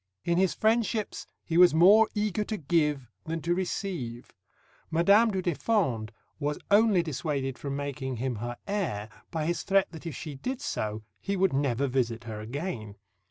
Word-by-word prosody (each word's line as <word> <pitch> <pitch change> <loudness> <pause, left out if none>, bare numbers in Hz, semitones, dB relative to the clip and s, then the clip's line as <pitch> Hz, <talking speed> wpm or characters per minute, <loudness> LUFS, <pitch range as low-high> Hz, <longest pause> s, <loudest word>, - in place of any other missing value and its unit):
In 170 +1 +2
his 190 -1 +2
friendships 220 -1 0 0.2
he 165 0 +1
was 180 -3 +7
more 205 +7 +7
eager 210 0 0
to 215 - -3
give 150 - +1 0.2
than 165 +1 -2
to 175 - +1
receive. 175 - -4 0.6
Madame 200 +8 +5
du 190 -3 -2
Deffand 150 - 0 0.3
was 150 0 -1
only 205 -3 +5
dissuaded 140 -4 -3
from 140 -1 -4
making 140 -2 -3
him 125 0 -2
her 120 +2 -5
heir 165 - -2 0.2
by 160 -2 -2
his 175 +2 0
threat 195 -1 +2
that 165 0 -8
if 155 - -5
she 150 - -6
did 250 - -4
so 110 - -3 0.2
he 200 - -2
would 190 -3 +2
never 135 -1 +1
visit 120 -3 -1
her 110 -3 -6
again. 115 - -5
160 Hz, 165 wpm, -28 LUFS, 130-195 Hz, 0.6 s, was